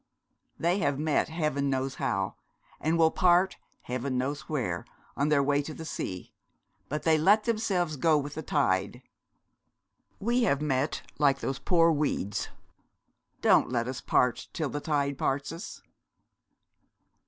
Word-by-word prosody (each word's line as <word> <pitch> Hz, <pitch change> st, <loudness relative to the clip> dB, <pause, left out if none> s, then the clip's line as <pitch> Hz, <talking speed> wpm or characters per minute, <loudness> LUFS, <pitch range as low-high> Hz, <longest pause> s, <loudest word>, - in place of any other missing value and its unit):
They 175 Hz, +4 st, +1 dB
have 145 Hz, -8 st, +1 dB
met 155 Hz, +1 st, +1 dB
heaven 150 Hz, -4 st, -1 dB
knows 135 Hz, 0 st, -1 dB
how, 95 Hz, -1 st, 0 dB, 0.5 s
and 160 Hz, +2 st, +1 dB
will 160 Hz, -1 st, +5 dB
part 180 Hz, +1 st, +3 dB, 0.3 s
heaven 125 Hz, +1 st, -3 dB
knows 140 Hz, +3 st, -3 dB
where, 110 Hz, -, -2 dB, 0.3 s
on 140 Hz, +2 st, +1 dB
their 145 Hz, -2 st, +4 dB
way 145 Hz, +1 st, +2 dB
to 155 Hz, +2 st, -7 dB
the 160 Hz, -, -8 dB
sea; 90 Hz, -, -5 dB, 0.6 s
but 150 Hz, +1 st, -3 dB
they 160 Hz, -1 st, +4 dB
let 205 Hz, +7 st, +5 dB
themselves 195 Hz, -9 st, 0 dB
go 155 Hz, +3 st, +4 dB
with 145 Hz, 0 st, -3 dB
the 155 Hz, -, -5 dB
tide. 120 Hz, -5 st, 0 dB, 1.2 s
We 240 Hz, +4 st, +1 dB
have 160 Hz, -, +2 dB
met 145 Hz, -1 st, -1 dB, 0.2 s
like 140 Hz, -2 st, +4 dB
those 135 Hz, -1 st, -3 dB
poor 165 Hz, -2 st, +4 dB
weeds. 105 Hz, -, -1 dB, 0.9 s
Don't -, -, +5 dB
let 120 Hz, -1 st, -1 dB
us 130 Hz, 0 st, -4 dB
part 125 Hz, -1 st, +1 dB
till 155 Hz, -4 st, -2 dB
the 145 Hz, -, -4 dB
tide 140 Hz, -3 st, -1 dB
parts 140 Hz, +2 st, -1 dB
us.' 165 Hz, +6 st, -8 dB
145 Hz, 145 wpm, -28 LUFS, 135-165 Hz, 1.2 s, will